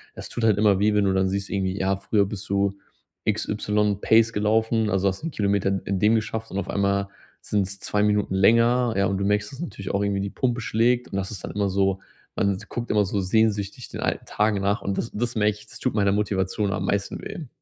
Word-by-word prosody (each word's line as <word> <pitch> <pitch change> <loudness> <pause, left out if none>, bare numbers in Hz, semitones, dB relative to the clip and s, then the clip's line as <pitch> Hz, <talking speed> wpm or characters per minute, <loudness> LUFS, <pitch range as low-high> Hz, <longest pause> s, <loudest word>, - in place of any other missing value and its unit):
das - - -8
tut 120 - -4
halt 105 -3 +4
immer 105 -2 +4
weh, 105 +1 +3
wenn 105 -1 +3
du 95 -1 +2
dann 95 0 +2
siehst 100 0 -3
irgendwie, 95 -1 -1
ja, 95 0 0
früher 100 +1 +1
bist 100 0 -7
du 100 0 +1 0.5
XY 105 -1 0
Pace 115 +1 +4
gelaufen, 110 +1 +1
also 95 0 +2
hast 95 +7 -6
'n 165 - -3
Kilometer 100 -5 0
in 95 0 0
in 95 -1 -1
dem 105 +4 +4
geschafft 110 0 -2
und 95 - -5
auf 95 - -5
einmal 100 0 0 0.3
sind's 100 -1 -2
2 105 0 0
Minuten 105 -2 +1
länger, 115 +5 +4
ja, 100 - +3
und 100 - -1
du 100 - -1
merkst, 105 +1 0
dass 135 - -11
natürlich 130 - -5
auch 100 - +1
irgendwie 100 -1 0
die 100 - -2
Pumpe 125 +3 -1
schlägt 120 +3 +1
und 100 - -2
das 95 0 -2
ist 105 - -8
dann - - -5
immer 100 -1 0
so 95 0 +1 0.4
man 100 -1 +2
guckt 120 0 -4
immer 105 -1 +3
so 100 +1 -1
sehnsüchtig 100 +1 0
den - - -7
alten - - -1
Tagen 105 -1 +1
nach 100 +2 0
und 100 - -1
das 115 - -3
das 120 +3 -2
merke 105 -1 +2
ich, 105 - -15
das - - -11
tut - - -1
meiner 100 -2 +3
Motivation 100 0 0
am - - -2
meisten 100 0 -1
weh. 155 - -7
100 Hz, 240 wpm, -24 LUFS, 100-110 Hz, 0.5 s, halt